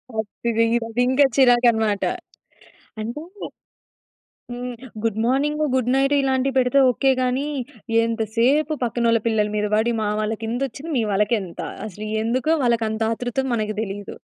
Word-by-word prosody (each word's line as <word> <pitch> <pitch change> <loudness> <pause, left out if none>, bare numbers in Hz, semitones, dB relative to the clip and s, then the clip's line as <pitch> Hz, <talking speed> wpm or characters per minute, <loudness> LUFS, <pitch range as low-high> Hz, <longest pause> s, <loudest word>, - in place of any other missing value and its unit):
అది 220 +2 -3
ది 230 - +4 0.2
అదింకా 250 +4 +3
చిరాకనమాట. 240 -5 +4 1.0
అంటే 235 +7 -5 1.3
హ్మ్. 245 0 -5 0.3
గుడ్ 220 -1 0
మార్నింగ్, 290 +5 +1
గుడ్ 250 -1 +1
నైట్ 275 +1 +2
ఇలాంటివి 265 0 0
పెడితే 255 +1 +3
ఓకె 270 +2 +2
గాని, 255 +3 0 0.6
ఎంతసేపు 230 +7 +1
పక్కనోళ్ళ 235 -1 +1
పిల్లల 220 -2 +2
మీద 210 0 0
పడి 225 +2 +1
మా 215 - 0
వాళ్ళకింతోచ్చింది, 230 +7 -3
మీ 230 - +2
వాళ్ళకేంత? 200 -2 0 0.3
అసలు 215 +1 -7 0.2
ఎందు‌కో 255 +7 +1
వాళ్ళకంత 225 -2 0
ఆతృత 245 +3 -2
మనకు 215 -2 -1
తెలీదు. 200 -1 -6
235 Hz, 120 wpm, -22 LUFS, 220-260 Hz, 1.3 s, ది